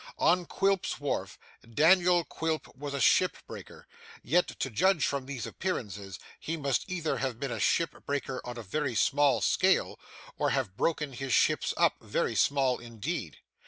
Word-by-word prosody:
On 175 -1 +2
Quilp's 195 -1 0
Wharf, 115 -10 -3 0.2
Daniel 175 +8 +4
Quilp 160 -1 -4
was 140 0 -5
a - - -2
ship 120 - +4
breaker, - - -11 0.4
yet 175 +9 +2
to 130 - -2
judge 180 - +3
from 140 -2 -2
these 135 -6 -5
appearances 100 - -4 0.2
he 165 +1 -4
must 140 -4 -1
either 170 -4 -1
have 130 -4 -3
been 140 -3 -3
a 115 - -3
ship 165 +10 +1
breaker 140 -2 -2
on 120 0 -7
a 120 - -6
very 130 +5 -2
small 140 -1 +3
scale, - - +2 0.4
or - - +2
have 95 - -1
broken 150 +1 -1
his 135 0 -3
ships - - +3
up - - +3
very - - -1
small 135 -3 +2
indeed. 115 - -5
140 Hz, 160 wpm, -29 LUFS, 120-165 Hz, 0.4 s, Daniel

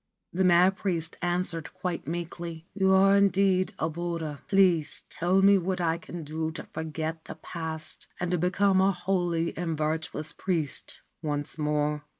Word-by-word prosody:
The 185 +2 +1
mad 180 +2 +5
priest 170 -5 -2
answered 175 -2 -1
quite 180 -5 -4
meekly: 170 0 -5
'You 190 -1 +2
are 195 +1 +6
indeed 195 -1 +3
a 160 - 0
Buddha. 165 -3 -4
Please 185 -6 +3
tell 185 +3 +2
me 200 0 +7
what 185 +1 -2
I 165 -1 +1
can 170 -1 -7
do 160 +2 -3
to - - -6
forget 160 +1 -4
the - - -7
past, 160 -2 -6
and 180 0 -1
to 180 - +1
become 190 +2 +3
a 195 +1 +4
holy 175 -2 -1
and 165 -2 -2
virtuous 155 0 -2
priest 165 -7 -2 0.2
once 145 0 -3
more.' 150 0 0
170 Hz, 155 wpm, -28 LUFS, 160-185 Hz, 0.2 s, me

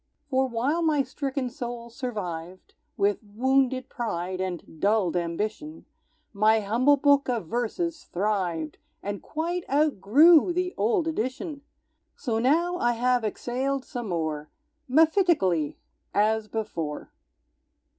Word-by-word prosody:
For 265 0 +2
while 260 +8 0
my 305 -4 +2
stricken 275 -1 -3
soul 240 -2 -6
survived, 185 -8 -6 0.2
With 200 0 +2
wounded 255 +4 +1
pride 185 -8 -3
and 175 -3 -5
dulled 200 -4 +2
ambition, 210 - -3 0.5
My 215 +2 +4
humble 245 +8 +3
book 280 -1 +3
of 235 -7 -1
verses 300 - -2
thrived 175 -5 -2 0.2
And 205 0 -4
quite 340 +3 -3
outgrew 300 - +5
the 360 +1 -1
old 235 - +1
edition! 280 +2 -3 0.5
So 225 -4 -2
now 335 +8 +2
I 240 -7 +2
have 245 0 +1
exhaled 255 +5 -2
some 240 -4 -5
more, 155 -3 -2 0.4
Mephitically, 310 - +3 0.4
as 215 +1 +2
before! 170 -10 -4
240 Hz, 115 wpm, -26 LUFS, 200-285 Hz, 0.5 s, outgrew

